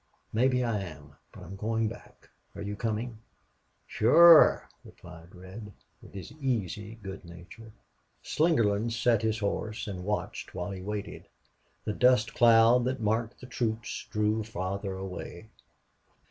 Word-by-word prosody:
"Maybe 125 +2 +2
I 115 -3 -1
am. 75 -6 -9 0.2
But - - -12
I'm 95 - -9
going 110 +2 -1
back. 110 - -12 0.2
Are 100 - -7
you 105 0 -4
coming?" 110 +1 -3 0.7
"Shore," 165 +9 +6 0.2
replied 85 0 -14
Red, 95 +4 -10 0.3
with - - -15
his 95 - -8
easy 110 -4 -2
good 95 0 -8
nature. 85 +6 -13 0.5
Slingerland 115 -8 +1
sat 115 -1 +2
his 110 -1 0
horse 105 0 -3
and 95 -3 -6
watched 105 +2 -4
while 90 +3 -4
he 95 -1 -7
waited. 105 +1 -6 0.6
The 105 - -2
dust 125 0 +3
cloud 115 +1 +5
that 130 +1 -2
marked 110 +2 -1
the - - -9
troops 115 -3 -3
drew 105 +1 0
farther 100 -1 -4
away. 95 +2 -8
110 Hz, 135 wpm, -28 LUFS, 95-115 Hz, 0.7 s, Shore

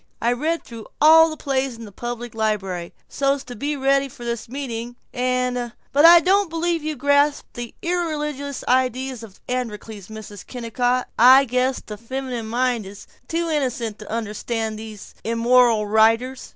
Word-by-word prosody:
I 235 +1 +2
read 315 +7 -1
through 230 -3 -10
all 320 +2 +7
the 310 - -7
plays 270 -3 -1
in 230 - -9
the 205 - -11
public 240 +2 -6
library, 195 -6 -2 0.2
so's 275 0 0
to 245 - -9
be 290 +6 -2
ready 275 0 +2
for 240 -1 -11
this 235 -1 -4
meeting. 240 -3 -5 0.2
And 250 -1 -1 0.2
But 290 +3 +5
I 340 +1 +10
don't 390 +1 +2
believe 330 0 -1
you 310 0 -2
grasp 285 +2 +2
the 240 -1 -7
irreligious 300 -5 -2
ideas 255 0 0
in 225 - -9
this 190 - -23
'Androcles,' 220 -5 -5
Mrs. 215 -2 -10
Kennicott. 245 +1 -1
I 260 +3 +8
guess 255 +1 0
the 210 - -7
feminine 245 0 -5
mind 240 -2 0
is 200 +1 -11 0.2
too 335 0 -1
innocent 250 -8 -2
to 215 - -10
understand 225 0 -3
all - - -8
these 215 -2 -10
immoral 230 -1 +3
writers. 225 +5 +2
250 Hz, 165 wpm, -22 LUFS, 225-280 Hz, 0.2 s, I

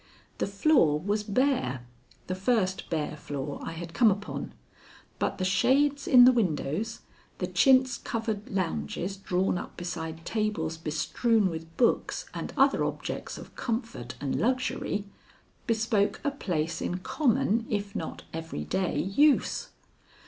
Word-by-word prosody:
The - - 0
floor 200 - +3
was 205 +5 0
bare 205 - 0 0.4
the 185 - -3
first 190 -1 0
bare 155 -2 -2
floor 145 -1 -5
I 165 - -5
had 165 0 -7
come 235 -3 +5
upon 200 +1 -3 0.7
but - - -1
the 185 - -1
shades 275 +9 +2
in 245 -1 +9
the 255 - +8
windows, 200 - -1 0.4
the - - -1
chintz 260 -2 +4
covered 220 -2 -3
lounges 180 - -2
drawn 185 -1 0
up - - -9
beside 165 -2 -5
tables 210 -8 -1
bestrewn 180 - +1
with 165 0 -8
books 240 - +1
and - - -5
other - - +4
objects - - -4
of - - -11
comfort 225 - -4
and 140 -2 -1
luxury, 250 -4 0 0.6
bespoke 220 -3 +1
a 285 - +1
place 165 - -2
in 180 - -1
common 230 - +1
if 205 -1 -2
not 160 - -5
every 160 - -4
day 185 - -1
use. 280 +10 +2
195 Hz, 135 wpm, -28 LUFS, 165-230 Hz, 0.7 s, in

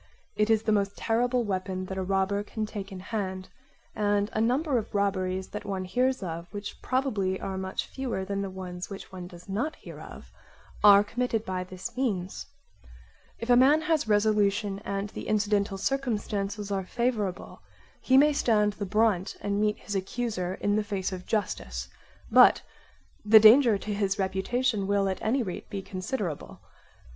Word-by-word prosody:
It 210 +1 +1
is 220 -1 +3
the 220 - +1
most 200 -1 0
terrible 245 +2 +1
weapon 185 -2 -3
that 190 +1 -6
a - - -1
robber 195 +1 0
can 215 +1 -4
take 205 -2 -7
in 190 - -7
hand; 190 -2 -4 0.5
and 205 -1 +1
a 215 - 0
number 255 +3 +2
of 210 - -8
robberies 190 -2 0
that 210 - -6
one 195 -2 -3
hears 255 +4 0
of, 170 -1 -6
which 205 -1 -7
probably 215 -8 0
are 190 - -4
much 190 0 -3
fewer 245 -8 -4
than 200 +1 -2
the 195 - -3
ones 180 -1 -7
which 195 -1 -9
one 180 -2 -7
does 175 -1 -13
not 230 +11 -2
hear - - -11
of, - - -11 0.5
are 205 -1 +8
committed 230 0 -2
by 185 -1 -2
this 185 +1 -8
means. 200 -8 -2 0.9
If 235 +1 -2
a - - +8
man 275 +5 +5
has 315 -5 +1
resolution 205 -1 +2
and 200 0 -4
the - - -8
incidental 205 -2 +1
circumstances 210 -4 -2
are 195 -1 -1
favourable, 215 -3 -2 0.4
he 260 - +4
may 295 +2 +6
stand 210 -6 +2
the 200 -1 -5
brunt 210 -2 +1
and 200 0 -1
meet 210 0 +1
his 205 - -7
accuser 190 -2 -2
in 205 +1 0
the 215 - +1
face 200 -3 -3
of 185 -1 -7
justice; 60 - -2 0.4
but - - +7 0.6
the 215 +1 +8
danger 225 +1 +7
to 210 +1 -4
his 200 0 0
reputation 200 +3 0
will 200 -1 +2
at 190 - -3
any 250 +4 +1
rate 185 -5 -6
be 195 -1 -5
considerable. 185 - -4
205 Hz, 170 wpm, -28 LUFS, 190-225 Hz, 0.9 s, are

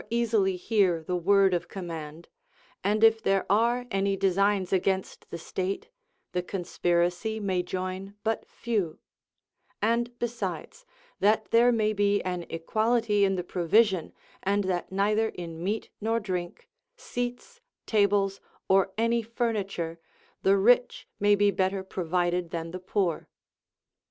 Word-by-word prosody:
42 235 - -1
i - - +2
easily 210 -5 +2
hear 180 -4 +1
the 180 +3 -2
word 195 +2 +4
of 175 0 -1
command; 165 -3 -7 0.6
and 210 +2 +1
if 225 0 +6
there 195 -2 +1
are 235 +4 +2
any 195 0 +1
designs 195 0 +1
against 190 0 -1
the - - -5
state, 190 - -4 0.4
the 180 - -1
conspiracy 180 +3 -1
may 190 -3 0
join 185 +2 -5
but 225 0 -1
few; 210 -9 -2 0.8
and 235 +2 0
besides, 240 - -5 0.3
that 215 +2 +2
there 235 +2 +5
may 215 -2 +1
be 205 0 +2
an 180 -2 -3
equahty 215 +5 +1
in 195 -1 +3
the 180 - -2
provision, 185 +1 +2 0.3
and 200 +1 +1
that 185 -1 -2
neither 210 +3 +1
in 165 -3 -7
meat 210 +4 -2
nor 225 +2 +1
drink, 180 -4 -5 0.3
seats, 245 - -5 0.2
tables, 200 -2 +2 0.3
or 190 0 +3
any 230 +1 +2
furniture, 205 -8 -3 0.4
the 195 +1 +4
rich 245 +5 +3
may 205 0 +4
be 205 0 +3
better 190 0 0
provided 175 -1 -1
than 165 -1 -4
the 185 - -6
poor. 185 -3 -1
195 Hz, 135 wpm, -27 LUFS, 180-220 Hz, 0.8 s, if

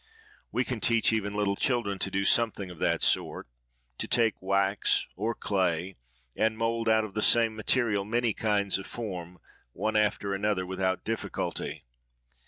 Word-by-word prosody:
We 125 - +1
can 125 -3 -3
teach 115 0 +3
even 100 -2 -1
little 100 -1 +1
children 120 -6 0
to - - 0
do 100 +1 -1
something 105 -5 +2
of 85 - -12
that - - +1
sort,—to - - -3
take 115 -3 +2
wax 100 +1 +1
or 110 +5 -2
clay, 95 -2 -1 0.4
and 110 0 +1
mould 115 0 0
out 110 0 +4
of 105 -2 -7
the 110 - -1
same 115 -1 +4
material 110 -2 +1
many 115 +2 0
kinds 100 -3 +1
of 95 - -8
form, 90 -6 -6 0.4
one 110 0 -2
after 105 -2 +1
another, 100 -1 0
without 95 0 -1
difficulty. 115 +1 -4
105 Hz, 155 wpm, -28 LUFS, 95-110 Hz, 0.4 s, out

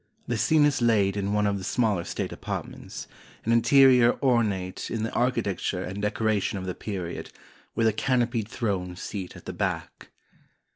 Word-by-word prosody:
The - - 0
scene 155 -2 +4
is 145 -3 +1
laid 105 -4 +3
in 100 0 -1
one 105 0 +2
of 100 -1 0
the - - -7
smaller 105 -4 +1
state - - -3
apartments, - - -6 0.4
an 115 - +1
interior 125 +1 +6
ornate 105 -8 +1
in 115 -2 -2
the 115 - -2
architecture 110 -7 0
and 95 +2 -5
decoration 105 -1 0
of 95 - -5
the 90 - -2
period, 90 -5 -5 0.5
with 115 - +2
a 110 - +4
canopied 120 -2 0
throne 95 -7 -2
seat 95 0 -6
at - - -13
the - - -5
back. - - -3
110 Hz, 165 wpm, -26 LUFS, 95-120 Hz, 0.5 s, interior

